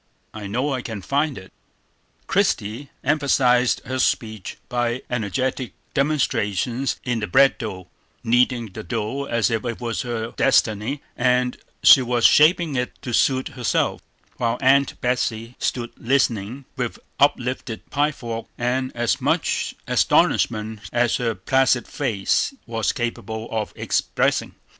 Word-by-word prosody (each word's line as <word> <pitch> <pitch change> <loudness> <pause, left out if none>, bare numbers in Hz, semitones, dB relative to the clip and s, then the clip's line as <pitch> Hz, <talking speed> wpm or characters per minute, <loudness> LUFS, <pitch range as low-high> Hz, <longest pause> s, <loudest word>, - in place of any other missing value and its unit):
I 105 -2 -6
know 125 +8 -1
I 130 - -2
can 110 -5 -6
find 145 +3 0
it." 95 0 -12 0.7
Christie 115 +7 0
emphasized 130 -4 +2
her 130 0 -3
speech 110 -6 -1
by 120 +1 -1
energetic 125 +3 -2 0.2
demonstrations 130 -4 0
in 120 -3 -1
the 105 - -3
bread 135 +10 +4
trough, 95 -6 -5 0.4
kneading 120 -1 +2
the - - -7
dough 115 +8 -3
as 115 -2 +1
if 115 +1 -1
it 120 -2 -4
was 120 -2 -2
her 115 -2 -3
destiny, 110 +6 +1
and 125 0 +2 0.3
she 135 - +9
was 120 -1 +1
shaping 160 -1 +5
it 125 -1 -3
to 120 - -4
suit 130 +3 +2
herself; 125 -4 -1 0.4
while 115 -1 0
Aunt 135 +1 +3
Betsey 120 -1 -1
stood 120 -2 -2
listening, 120 -1 0
with - - -3 0.2
uplifted 125 -2 0
pie 145 +1 +2
fork, 115 -5 -6
and 130 +2 -1
as 120 -1 0
much - - 0
astonishment 110 -1 +2
as 120 0 +2
her 115 -3 -1
placid 130 +5 +2
face 120 - 0
was 115 -2 -1
capable 115 -3 -4
of 110 -2 -2
expressing. - - 0
120 Hz, 135 wpm, -22 LUFS, 110-130 Hz, 0.7 s, she